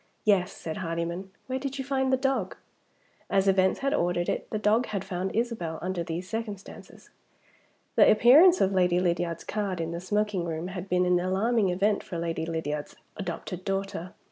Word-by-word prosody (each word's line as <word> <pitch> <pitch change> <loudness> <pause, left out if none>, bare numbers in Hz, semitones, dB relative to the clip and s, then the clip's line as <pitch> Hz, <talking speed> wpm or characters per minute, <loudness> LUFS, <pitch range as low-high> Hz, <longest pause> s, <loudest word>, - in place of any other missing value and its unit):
"Yes," 195 -4 +3
said 160 -1 -6
Hardyman. 170 +2 -3 0.2
"Where 260 0 -3
did 275 0 -4
you 270 - -4
find 265 -1 0
the 260 - +4
dog?" 260 -8 -1 0.7
As 195 0 +2
events 190 -1 +3
had 275 +1 +1
ordered 175 -5 0
it, - - -3
the 215 - -2
dog 215 +3 +2
had 195 -2 -3
found 190 0 -3
Isabel, 220 -9 -2
under 185 0 -3
these 170 +2 -5
circumstances. 210 -2 -7 0.8
The - - +7
appearance 295 - +7
of 190 - +3
Lady 180 -1 +3
Lydiard's 170 -2 -1
card 200 -4 -2
in 165 0 -2
the 170 +1 -4
smoking 210 -1 0
room 165 +1 -4
had 185 0 -6
been 180 0 +2
an 180 0 +3
alarming 195 +4 +1
event 200 +3 +1
for 175 - -6
Lady 165 -1 -2
Lydiard's 150 -3 -3 0.2
adopted 180 -1 -5
daughter. 195 -2 -3
190 Hz, 175 wpm, -27 LUFS, 175-215 Hz, 0.8 s, The